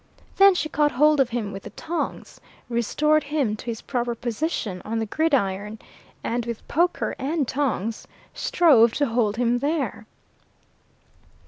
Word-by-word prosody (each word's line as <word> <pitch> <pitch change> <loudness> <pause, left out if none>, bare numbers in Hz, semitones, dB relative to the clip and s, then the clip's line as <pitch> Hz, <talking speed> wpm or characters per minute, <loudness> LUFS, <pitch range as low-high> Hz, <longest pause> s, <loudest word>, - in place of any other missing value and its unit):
Then 390 -1 +7
she 315 - -1
caught 295 -1 +1
hold 300 +3 +4
of 265 -3 +3
him 230 -4 -3
with 195 0 -7
the - - -9
tongs, 340 +1 -5 0.3
restored 300 +7 +1
him 280 -7 0
to - - -11
his 230 -2 -4
proper 240 -2 -2
position 230 - -3
on 225 +2 -3
the 225 - -1
gridiron, 210 -7 0 0.5
and 240 +1 -1
with 235 -1 -6
poker 345 +3 0
and 285 +1 -1
tongs 230 -6 -2 0.3
strove 245 -10 +4
to 290 - +1
hold 225 -3 0
him 245 0 +1
there. 280 -7 -2
245 Hz, 145 wpm, -24 LUFS, 225-300 Hz, 0.5 s, Then